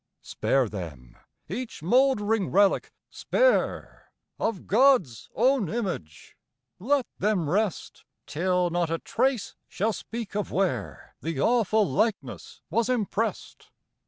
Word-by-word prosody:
Spare 135 -3 0
them, 80 - -8 0.3
each 250 -9 -6
mouldering 225 -1 +2
relic 200 0 +3 0.2
spare, - - 0 0.3
Of 220 -5 -2
God's 210 - +3
own 250 - +2
image; 180 - -5 0.4
let 265 +6 +1
them 200 -6 +1
rest, 200 +3 -2 0.2
Till 180 +2 0
not 175 -1 0
a 165 - 0
trace 250 +3 -1
shall 215 +3 -1
speak 225 -2 -7
of 210 - -2
where 190 -1 -2
The 165 -4 -3
awful 220 - +3
likeness 155 - -2
was 230 +5 +1
impressed. 225 -2 -2
205 Hz, 110 wpm, -26 LUFS, 170-235 Hz, 0.4 s, relic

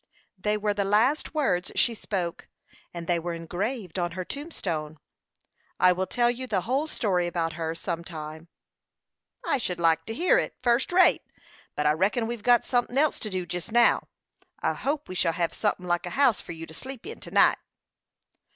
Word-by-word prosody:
They 210 +2 0
were 210 0 0
the 200 0 0
last 230 +11 +2
words 180 -13 +1
she 235 - +3
spoke, 185 -6 -4 0.4
and 170 -1 -6
they 170 0 +1
were 170 0 -4
engraved 185 +3 -4
on 175 -1 -1
her 185 +1 -4
tombstone. 170 - -4 0.8
I 185 - +6
will 185 +1 -1
tell 240 -1 +2
you 255 +2 -6
the 200 -6 0
whole 265 - 0
story 185 - 0
about 165 -2 -1
her 160 0 -3
some 170 -1 -3
time." 160 -1 -8 1.0
"I 275 - +1
should 180 -6 -3
like 165 -1 +3
to 225 - -5
hear 365 - +4
it, - - -3
fust 240 +4 +2
rate; 365 +1 +5 0.5
but 150 - -1
I 150 - +5
reckon 195 +9 +1
we've 235 -1 -4
got 240 +2 +4
sunthin' 245 0 0
else 300 +1 +3
to 215 - -4
do 185 -2 -3
jest 175 +5 -5
now. 235 +1 +4 0.5
I - - 0
hope 290 +2 -2
we - - -6
shall 165 -2 +1
hev 170 0 -1
sunthin' 205 -4 -1
like 175 0 0
a 175 - -6
house 270 -6 +4
for - - -8
you 165 0 -7
to 160 - -13
sleep 260 - -7
in 445 +4 -7
to - - -10
night." - - +5
190 Hz, 195 wpm, -27 LUFS, 170-245 Hz, 1.0 s, I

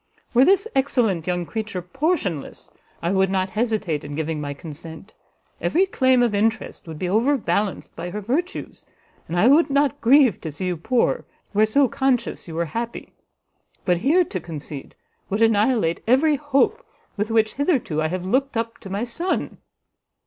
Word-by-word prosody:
Were 250 +1 +6
this 390 +3 +3
excellent 230 - +1
young 175 -1 -1
creature 215 -1 -4
portionless, 270 - -2 0.3
I 170 - +1
would 190 -1 +2
not 190 -1 0
hesitate 215 -9 -1
in 145 0 -6
giving 155 0 -2
my 145 -1 -4
consent; 160 +5 -10 0.5
every 370 +4 +3
claim 260 -9 +3
of 235 -3 +1
interest 220 -2 -1
would 160 -1 -7
be 180 - -2
overbalanced 215 -1 0
by 170 +2 -5
her 205 +4 -4
virtues, 290 - -3 0.4
and 170 - -3
I 210 - +4
would 290 +6 +5
not 280 -1 +1
grieve 260 -1 +5
to 160 - -4
see 150 +5 -5
you 180 -2 -1
poor, 235 +9 0 0.3
where 215 +1 +3
so 275 +5 +3
conscious 250 -4 -1
you 165 - -7
were 170 +1 0
happy; 235 0 -5 0.7
but 180 -1 +3
here 310 - +4
to 200 - -5
concede, 150 -4 -8 0.3
would 205 +3 +1
annihilate 215 -5 +2
every 285 +6 +4
hope 290 - +1 0.3
with 210 +1 -2
which 220 -1 +2
hitherto 270 - 0
I 155 - +1
have 180 +2 -4
looked 260 +5 0
up 230 0 -3
to 195 - -10
my 200 +4 -2
son." 335 +10 -3
220 Hz, 170 wpm, -23 LUFS, 175-265 Hz, 0.7 s, Were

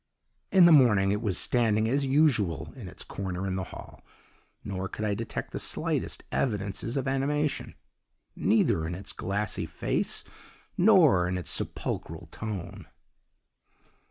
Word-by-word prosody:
"In 185 -3 +7
the 170 - +7
morning 105 -10 +5
it 105 +1 -1
was 105 -5 0
standing 110 -3 +2
as 135 +3 +1
usual 130 - +2
in - - -9
its - - -7
corner 95 -1 -4
in 95 -1 -2
the 95 -1 -3
hall, - - -11 0.6
nor 95 -1 -4
could 110 - -4
I 105 - +1
detect 115 +3 -5
the - - -4
slightest - - -2
evidences 105 +2 -1
of 135 - -2
animation, 140 +2 -1 0.6
neither 80 -1 +2
in 85 - -4
its 95 +2 -7
glassy 105 +2 -2
face - - -2 0.5
nor 170 - +5
in 90 +1 -1
its 90 - -2
sepulchral - - -4
tone. 100 -3 -6
105 Hz, 140 wpm, -28 LUFS, 95-135 Hz, 0.6 s, In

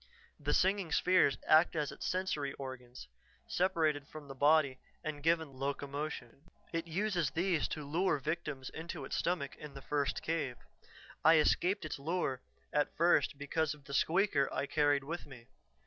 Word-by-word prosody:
The - - 0
singing 190 -3 +2
spheres 180 -6 +4
act 160 +3 +5
as 150 -2 -1
its - - -5
sensory 180 -7 -1
organs, 130 -2 -8 0.4
separated 160 -6 +1
from 155 -2 -10
the 135 - -7
body 140 -1 +3 0.2
and 155 -2 -4
given 160 -2 +1
locomotion. 140 0 -4 0.3
It 165 0 -2
uses 175 -2 0
these 170 -1 +1
to 150 -2 -5
lure 170 +3 +1
victims 140 -2 -4
into 160 -3 -6
its - - -4
stomach 170 -5 -1
in 150 -2 -10
the 135 - -8
first 140 -2 -1
cave. 150 -6 -2 0.7
I 160 +1 +7
escaped 180 +4 +2
its 155 - -5
lure 140 -4 -1 0.3
at 150 -1 0
first 155 -5 +3
because 150 +2 -1
of 145 - -19
the 140 - -8
'squeaker' 160 -1 +2
I - - -1
carried 145 -1 +2
with 165 +3 -5
me. 125 -4 -13
150 Hz, 160 wpm, -34 LUFS, 140-165 Hz, 0.7 s, I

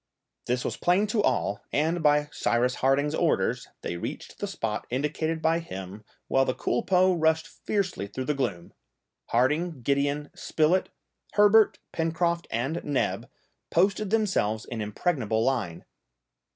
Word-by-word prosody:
This 125 +1 0
was - - -2
plain 180 +4 +3
to 215 0 0
all, 100 - 0
and, 160 +4 +1
by 150 -1 +3
Cyrus 125 +2 +1
Harding's 140 +3 +2
orders, - - +1 0.2
they 85 - -3
reached - - -7
the - - -2
spot - - -3
indicated 155 +5 -1
by 165 +1 +3
him, 95 - -8 0.2
while 135 - +3
the 130 - -1
culpeux 185 +9 +2
rushed 160 0 +2
fiercely 190 - -2
through 130 +6 -5
the 150 - +1
gloom. 100 -11 -3 0.5
Harding, 150 +4 +1
Gideon, 140 +2 0
Spilett, 165 +4 +1 0.4
Herbert, 210 +1 +5
Pencroft, 170 +1 0
and 135 +9 -2
Neb 145 -2 -1 0.4
posted 195 +4 +2
themselves 190 - +1
in 115 -3 -5
impregnable 110 - 0
line. 115 -11 -1
150 Hz, 135 wpm, -27 LUFS, 125-175 Hz, 0.5 s, Herbert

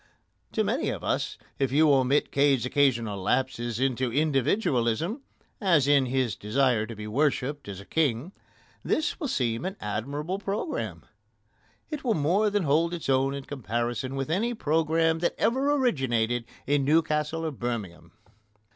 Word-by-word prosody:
To - - +1
many - - 0
of - - -4
us, - - -1 0.2
if 135 -2 +1
you 150 +1 +5
omit 135 +2 +2
Cade's 140 -4 +3
occasional 120 -7 +1
lapses 120 +1 -1
into 130 -2 0
individualism 145 - +1 0.4
as 170 -9 +3
in 140 -2 +4
his 125 -5 0
desire 115 0 +1
to 115 - -7
be 105 0 -7
worshipped 140 +3 -1
as 100 -2 -6
a 100 - -11
king 145 - 0 0.5
this 315 +2 0
will 305 - -2
seem 120 - -1
an 190 +1 -4
admirable 140 - -3
programme. 205 - -3 0.9
It 300 -2 -4
will 235 -4 +1
more 180 +8 +2
than 205 -1 0
hold 165 +4 +2
its 165 - -6
own 135 +1 +2
in 140 - -6
comparison 120 0 -3
with 135 +3 -3
any 230 +8 0
programme 160 -2 +1
that 170 - 0
ever 265 +6 +2
originated 120 - +1 0.2
in 145 0 +2
Newcastle 155 +1 +1
or 160 - -1
Birmingham. 115 -9 -5
140 Hz, 150 wpm, -27 LUFS, 120-165 Hz, 0.9 s, you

